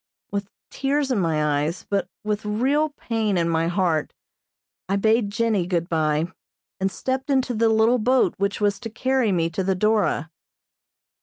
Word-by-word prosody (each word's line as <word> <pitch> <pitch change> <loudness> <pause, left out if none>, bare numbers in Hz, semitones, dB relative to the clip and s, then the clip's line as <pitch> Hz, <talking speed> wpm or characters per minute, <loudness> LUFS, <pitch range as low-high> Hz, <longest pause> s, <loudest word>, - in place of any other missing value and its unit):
With 200 -1 -3 0.2
tears 275 0 0
in 240 - +1
my 150 -4 +1
eyes, 160 +5 -3
but 200 -3 0 0.2
with 210 0 -2
real 265 +9 +1
pain 225 -8 -1
in 170 -1 +1
my 165 0 +1
heart 170 -4 0 0.7
I 195 - +2
bade 220 +1 +2
Jennie 215 -4 0
good 170 -2 -1
bye, 160 +1 0 0.5
and 190 0 0
stepped 260 +8 -3
into 260 -2 +1
the 225 0 +2
little 220 +3 +3
boat 245 -4 +3
which 200 +1 0
was 205 -1 +1
to 230 - -6
carry 255 0 +1
me 170 -3 +1
to 180 +3 -2
the 190 0 +1
"Dora." 200 -6 +1
205 Hz, 165 wpm, -23 LUFS, 175-230 Hz, 0.7 s, little